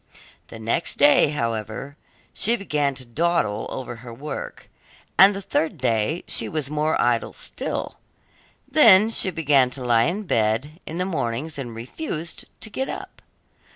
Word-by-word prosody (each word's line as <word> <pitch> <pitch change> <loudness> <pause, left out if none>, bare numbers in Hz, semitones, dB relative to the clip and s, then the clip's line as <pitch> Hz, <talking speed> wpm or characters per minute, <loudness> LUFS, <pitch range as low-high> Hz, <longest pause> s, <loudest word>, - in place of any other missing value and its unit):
The - - -10
next 115 +9 -1
day, 145 +1 +6
however, 115 0 -3 0.4
she 230 +3 +1
began 150 - -1
to 130 -1 -7
dawdle 120 -5 0
over 120 -2 -6
her 120 0 -10
work, 140 +6 -7 0.5
and 195 +1 +7
the 195 - -6
third 160 -2 -1
day 125 +5 0
she - - 0
was 150 -3 -3
more 155 +1 0
idle 120 -1 +1
still; - - -5 0.7
then 220 -7 +7
she 200 - +3
began 145 -7 +3
to 125 0 -6
lie 115 -1 +4
in 185 +7 -1
bed 115 - 0
in 160 - -5
the 180 - 0
mornings 145 -3 -3
and 120 -4 -6
refused 160 - -6 0.2
to 220 - -7
get 265 +6 -3
up. - - -8
145 Hz, 155 wpm, -23 LUFS, 120-170 Hz, 0.7 s, and